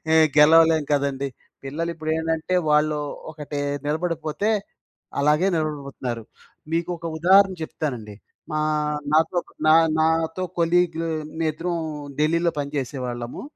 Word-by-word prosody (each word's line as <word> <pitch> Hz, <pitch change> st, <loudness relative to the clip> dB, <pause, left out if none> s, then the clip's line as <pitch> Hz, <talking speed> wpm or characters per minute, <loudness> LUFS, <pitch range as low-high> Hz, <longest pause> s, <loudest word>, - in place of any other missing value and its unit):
ఏ -, -, +7 dB, 0.2 s
గెలవలేం 160 Hz, +1 st, +6 dB
కదండీ. 140 Hz, -1 st, 0 dB, 0.4 s
పిల్లలు 160 Hz, +5 st, -3 dB
ఇప్పుడు 155 Hz, -1 st, -6 dB
ఏంటంటే 160 Hz, +2 st, -1 dB, 0.2 s
వాళ్ళు 150 Hz, 0 st, +3 dB, 0.3 s
ఒకటే 150 Hz, -2 st, -6 dB, 0.3 s
నిలబడిపోతే 160 Hz, +4 st, -1 dB, 0.7 s
అలాగే 150 Hz, +6 st, +3 dB
నిలబడిపోతున్నారు. 140 Hz, -6 st, -3 dB, 0.5 s
మీకు 165 Hz, +1 st, 0 dB
ఒక 165 Hz, -, -10 dB
ఉదాహరణ 190 Hz, +3 st, +5 dB
చెప్తానండి. 125 Hz, -9 st, -4 dB, 0.4 s
మా 155 Hz, -, 0 dB, 0.5 s
నాతో 160 Hz, +3 st, +3 dB
ఒక్ -, -, -22 dB, 0.2 s
నా 155 Hz, -, +7 dB, 0.3 s
నాతో 160 Hz, +2 st, +1 dB, 0.2 s
కొలీగ్ 170 Hz, 0 st, +2 dB, 0.4 s
మేమిద్దరం 165 Hz, +2 st, -1 dB, 0.4 s
ఢిల్లీలో 165 Hz, +3 st, +2 dB
పనిచేసేవాళ్ళము. 130 Hz, -4 st, -4 dB
155 Hz, 105 wpm, -23 LUFS, 145-165 Hz, 0.7 s, ఏ